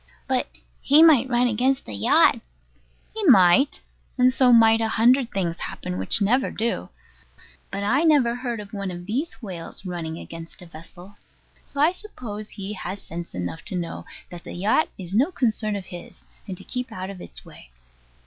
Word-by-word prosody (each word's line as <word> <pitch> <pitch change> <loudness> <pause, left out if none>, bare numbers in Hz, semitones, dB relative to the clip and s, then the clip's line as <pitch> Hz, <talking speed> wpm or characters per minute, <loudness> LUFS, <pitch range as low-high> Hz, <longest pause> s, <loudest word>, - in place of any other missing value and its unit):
But - - 0 0.3
he 300 +3 +6
might 275 -6 +5
run 245 0 +2
against 250 +3 0
the 110 - -8
yacht. 100 +1 +4 0.7
He 440 - -4
might: 245 - +5 0.4
and 255 0 +4
so 255 -1 +4
might 225 -1 +6
a 225 - +1
hundred 240 +3 +3
things 175 -4 -2
happen 90 +1 -5
which 95 - +3
never 250 +6 +2
do. 230 +2 -3 0.8
But 200 +1 -4
I 250 +8 +2
never 285 -8 +4
heard 240 -2 -4
of 205 0 -10
one 200 -2 -4
of 175 -1 -8
these 255 - -4
whales 185 -1 -8
running 165 -3 -5
against 165 +2 -10
a - - -11
vessel; 175 +4 -13 0.5
so 280 - -8
I 305 +4 +5
suppose 235 - -7
he 200 +1 -6
has 190 0 -6
sense 170 -1 -8
enough 90 -2 -5
to - - +2
know 170 -2 -5 0.3
that 175 -1 -10
the - - -9
yacht 210 - +1
is 185 -1 -7
no 265 - +2
concern 220 - -1
of 195 -2 -6
his, 175 -1 -11 0.2
and 185 -2 -6
to - - -11
keep 250 -1 -5
out 185 -1 -6
of 185 -2 -11
its - - -12
way. - - -15
210 Hz, 185 wpm, -23 LUFS, 175-250 Hz, 0.8 s, he